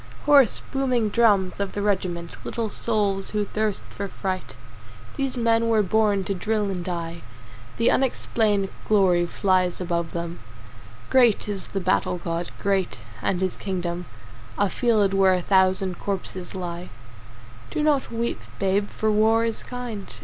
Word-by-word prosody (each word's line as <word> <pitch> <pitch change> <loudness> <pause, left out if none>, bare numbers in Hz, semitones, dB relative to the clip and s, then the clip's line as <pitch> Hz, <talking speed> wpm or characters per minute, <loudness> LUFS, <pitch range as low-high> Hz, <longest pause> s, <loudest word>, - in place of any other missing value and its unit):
Hoarse, 280 -6 +5
booming 255 -5 +1
drums 205 -5 +3
of 200 -1 -2
the 205 - -2
regiment, 180 -4 -1
Little 225 -3 -3
souls 205 -4 0
who 210 -1 -1
thirst 215 0 -1
for 200 - -4
fight, 185 -1 -4 0.6
These 270 -2 -2
men 230 -1 +2
were 220 -2 +4
born 205 0 +2
to 200 - -2
drill 210 +1 -1
and 180 -2 -3
die. 170 -1 -4 0.6
The 230 - +3
unexplained 215 -6 +1 0.2
glory 185 -5 +4
flies 185 0 +1
above 170 -2 -2
them, 170 0 -4 0.7
Great 245 -6 +4
is 200 -2 -4
the 195 - -3
battle 180 -1 +1
god, 170 0 -3
great, 195 -6 0 0.2
and 185 +7 0
his 185 -1 0
kingdom 180 -2 -3 0.5
A 200 -2 +1
field 215 -5 +2
where 190 -1 +5
a - - 0
thousand 190 -1 +2
corpses 190 -2 -4
lie. 175 -1 -5 0.8
Do 300 - -1
not 295 -3 +2
weep, 235 0 -2 0.2
babe, 200 +1 +1
for 220 0 0
war 220 +2 +3
is 225 -1 -2
kind. 245 -5 -6
200 Hz, 150 wpm, -24 LUFS, 185-220 Hz, 0.8 s, Hoarse